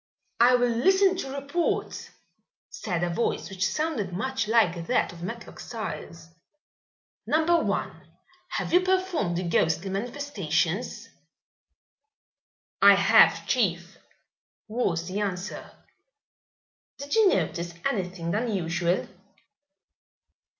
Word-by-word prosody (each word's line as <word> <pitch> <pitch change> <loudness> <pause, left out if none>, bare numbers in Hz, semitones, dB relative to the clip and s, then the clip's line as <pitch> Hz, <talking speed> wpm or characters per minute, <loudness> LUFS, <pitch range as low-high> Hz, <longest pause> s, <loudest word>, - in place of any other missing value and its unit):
"I 245 +2 +6
will 245 0 +2
listen 380 +11 +3
to 275 - -4
reports," 280 +5 -2 0.6
said 180 - -3
a 175 - 0
voice 220 0 -2
which 195 +1 0
sounded 300 - -2
much 225 +3 -2
like 195 -7 +2
that - - +1
of 170 - -12
Matlock 230 +6 -7
Styles. 170 -7 -7 1.0
"Number 320 +2 +3
One, - - -3 0.5
have - - -3
you 360 - +6
performed 370 - 0
the 180 0 -2
ghostly 165 +3 +1
manifestations?" 195 - -2 1.7
"I - - +8
have, - - +5
chief," 180 -7 -1 0.7
was 195 -7 -1
the 190 +2 -3
answer. 195 -1 -4 1.3
"Did 285 +1 -6
you 440 -3 +5
notice 170 - -1
anything 180 -9 -2
unusual?" 180 -5 -1
210 Hz, 100 wpm, -26 LUFS, 175-275 Hz, 1.7 s, I